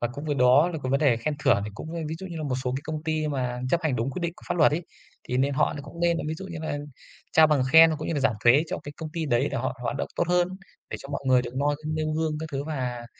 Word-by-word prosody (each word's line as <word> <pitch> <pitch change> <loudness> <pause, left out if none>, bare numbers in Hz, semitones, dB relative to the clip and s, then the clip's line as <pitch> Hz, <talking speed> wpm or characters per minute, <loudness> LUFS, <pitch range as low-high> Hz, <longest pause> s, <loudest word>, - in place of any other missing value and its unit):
Và 120 - 0
cũng 145 +3 -7
với 145 -2 -1
đó 130 +6 +5
là 165 - -4
cái 130 - -2
vấn 140 - +2
đề 140 -6 +4
khen 145 +6 -2
thưởng 130 -8 +3
thì 105 - -5
cũng, 160 +8 -7
a, - - -3
ví 160 - -3
dụ 190 - -7
như 170 -3 -7
là 155 - -4
một 135 -4 -1
số 125 - 0
cái 135 - -4
công 155 -1 -4
ty 155 -1 0
mà 125 -3 -2
chấp 170 - +2
hành 145 -6 0
đúng 115 +4 -1
quyết 180 - -5
định 170 -1 -1
của - - -17
pháp 175 - 0
luật 150 -2 +5
ấy, 170 +3 -1 0.5
thì 125 - 0
nên 135 +1 +1
họ 150 +2 +1
cũng 170 - -11
nên 170 -1 +3
là - - -4
ví 160 - -2
dụ 190 +4 -8
như 170 -3 -7
là 150 -2 -3 0.5
trao 160 0 +7
bằng 150 -4 +2
khen, 165 0 +9
cũng 155 - -5
như 165 - -1
là 145 - 0
giảm 130 -4 +2
thuế 130 +6 +6
cho - - -3
cái 145 - -7
công 155 -1 -6
ty 165 -2 -2
đấy 125 +1 +2
để - - -2
họ 130 +1 -2
hoạt 130 - -2
động - - -3
tốt 175 - 0
hơn, 180 0 +3 0.4
để - - -3
cho 140 - -10
mọi 140 - -4
người 125 -1 +4
được 120 +1 -7
noi 145 +1 +1
nêu 155 0 -1
gương 160 0 0
các 160 - -4
thứ 140 0 -2
và, 125 -6 -4
145 Hz, 325 wpm, -26 LUFS, 130-160 Hz, 0.5 s, khen